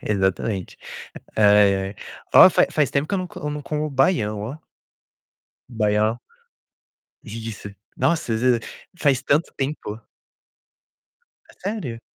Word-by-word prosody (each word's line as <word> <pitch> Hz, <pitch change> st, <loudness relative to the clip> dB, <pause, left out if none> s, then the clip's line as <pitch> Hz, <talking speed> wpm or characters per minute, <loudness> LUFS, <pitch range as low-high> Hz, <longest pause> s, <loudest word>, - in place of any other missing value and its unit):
Exatamente. 95 Hz, -1 st, -1 dB, 0.6 s
Ai, 105 Hz, -2 st, +5 dB
ai. 95 Hz, +1 st, -4 dB, 0.4 s
Ó, -, -, +10 dB
fa -, -, +3 dB
faz 150 Hz, -3 st, +1 dB
tempo 140 Hz, +2 st, 0 dB
que -, -, -4 dB
eu 195 Hz, -, +1 dB
não 185 Hz, -, -3 dB
co 150 Hz, -3 st, -6 dB
não 150 Hz, 0 st, -5 dB
como 150 Hz, +1 st, -3 dB
baião, 125 Hz, -, +1 dB
ó. 120 Hz, +8 st, -6 dB, 1.1 s
Baião. 110 Hz, 0 st, +1 dB, 1.0 s
Delícia. 110 Hz, -1 st, -7 dB, 0.3 s
Nossa, 165 Hz, -8 st, 0 dB
às 110 Hz, -, -2 dB
vez 125 Hz, -1 st, +3 dB, 0.4 s
faz 140 Hz, -4 st, +2 dB
tanto 150 Hz, +4 st, +1 dB
tempo. 135 Hz, -6 st, -4 dB, 1.5 s
É -, -, -17 dB
sério? 185 Hz, -, -5 dB
120 Hz, 125 wpm, -22 LUFS, 105-150 Hz, 1.5 s, Ó